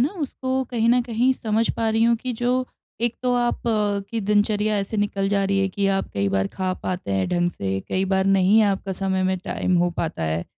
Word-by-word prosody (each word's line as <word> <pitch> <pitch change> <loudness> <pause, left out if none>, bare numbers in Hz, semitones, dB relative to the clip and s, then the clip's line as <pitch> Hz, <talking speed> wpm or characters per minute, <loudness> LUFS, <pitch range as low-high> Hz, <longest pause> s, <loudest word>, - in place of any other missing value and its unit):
ना, 265 - +3
उसको 265 -6 -2
कहीं 230 -1 +1
न 245 +1 +5
कहीं 240 +2 +1
समझ 225 -2 0
पा 225 - 0
रही 225 +1 +2
हूँ 235 0 +4
कि 250 +2 -4
जो 250 +1 +1 0.4
एक 235 -1 +1
तो 250 - +1
आप 240 0 0 0.5
की 230 -1 -2
दिनचर्या 210 +1 +1
ऐसे 200 +2 -3
निकल 200 -1 0
जा 200 -1 +1
रही 195 0 +1
है 195 0 +2
कि 200 +1 -1
आप - - -4
कई 100 0 +1
बार 95 0 +1
खा 185 -1 -2
पाते 180 - -3
हैं 95 -1 0
ढंग 175 0 +1
से, 95 - -3
कई 190 +1 0
बार 190 0 +1
नहीं 195 +3 +4
आपका 195 -1 0
समय 190 0 -1
में 185 0 +1
टाइम 180 0 -1
हो 175 0 +2
पाता 165 - -3
है। 80 +1 -1
200 Hz, 225 wpm, -23 LUFS, 185-230 Hz, 0.5 s, न